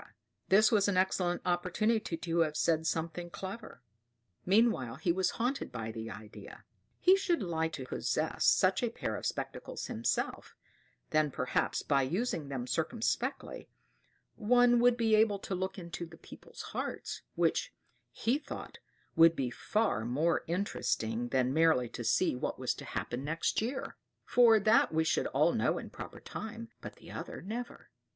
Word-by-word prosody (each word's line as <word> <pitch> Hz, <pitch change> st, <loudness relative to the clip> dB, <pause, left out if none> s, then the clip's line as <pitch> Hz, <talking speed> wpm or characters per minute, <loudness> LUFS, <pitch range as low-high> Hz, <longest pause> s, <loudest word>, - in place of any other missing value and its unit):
This 210 Hz, +3 st, +6 dB
was 205 Hz, -3 st, +4 dB
an 200 Hz, -2 st, +1 dB
excellent 185 Hz, -1 st, +1 dB
opportunity 180 Hz, +2 st, 0 dB
to 165 Hz, +1 st, -1 dB
have 155 Hz, -2 st, +1 dB
said 160 Hz, -1 st, +1 dB
something 165 Hz, +2 st, -2 dB
clever. 195 Hz, -, -8 dB, 0.6 s
Meanwhile 190 Hz, -, +3 dB
he 160 Hz, +5 st, 0 dB
was 185 Hz, +1 st, +1 dB
haunted 250 Hz, +4 st, -1 dB
by 115 Hz, -2 st, -4 dB
the 110 Hz, 0 st, -6 dB
idea 105 Hz, 0 st, -11 dB, 0.4 s
he 370 Hz, +1 st, +6 dB
should 355 Hz, -, 0 dB
like 160 Hz, -2 st, -1 dB
to 130 Hz, -, -5 dB
possess -, -, -1 dB
such -, -, +4 dB
a -, -, +1 dB
pair -, -, -4 dB
of -, -, -3 dB
spectacles -, -, -5 dB
himself; 115 Hz, +2 st, -2 dB, 0.6 s
then, 155 Hz, -1 st, +3 dB
perhaps, 130 Hz, -1 st, -1 dB
by 140 Hz, -2 st, +2 dB
using 165 Hz, -, -1 dB
them 130 Hz, -3 st, -3 dB
circumspectly, 230 Hz, -, -2 dB, 0.7 s
one 245 Hz, +2 st, +4 dB
would 245 Hz, 0 st, +4 dB
be 225 Hz, -2 st, +2 dB
able 215 Hz, -1 st, +4 dB
to 195 Hz, -, -6 dB
look 190 Hz, +1 st, -3 dB
into 170 Hz, -1 st, -6 dB
people's 165 Hz, 0 st, -12 dB
hearts, -, -, -4 dB
which, -, -, +1 dB, 0.4 s
he 250 Hz, +6 st, 0 dB
thought, -, -, -8 dB, 0.4 s
would 165 Hz, -1 st, +7 dB
be 130 Hz, -4 st, -2 dB
far 210 Hz, -, 0 dB
more 150 Hz, +8 st, +1 dB
interesting 120 Hz, -, -1 dB
than 130 Hz, 0 st, +1 dB
merely 160 Hz, -6 st, +4 dB
to 120 Hz, -, -6 dB
see 120 Hz, +8 st, +2 dB
what 125 Hz, -, -3 dB
was -, -, -1 dB
to -, -, -10 dB
happen 120 Hz, +2 st, -4 dB
next 160 Hz, +7 st, 0 dB
year; 250 Hz, +5 st, -4 dB, 0.3 s
for 230 Hz, -3 st, +6 dB
that 215 Hz, +3 st, +4 dB
we 160 Hz, 0 st, +2 dB
should 160 Hz, -, +1 dB
all -, -, +2 dB
know -, -, +1 dB
in -, -, -7 dB
proper -, -, -9 dB
time, 230 Hz, +1 st, -7 dB
but -, -, -8 dB
the -, -, -13 dB
other -, -, -7 dB
never. 235 Hz, +5 st, -6 dB
175 Hz, 160 wpm, -32 LUFS, 145-220 Hz, 0.7 s, would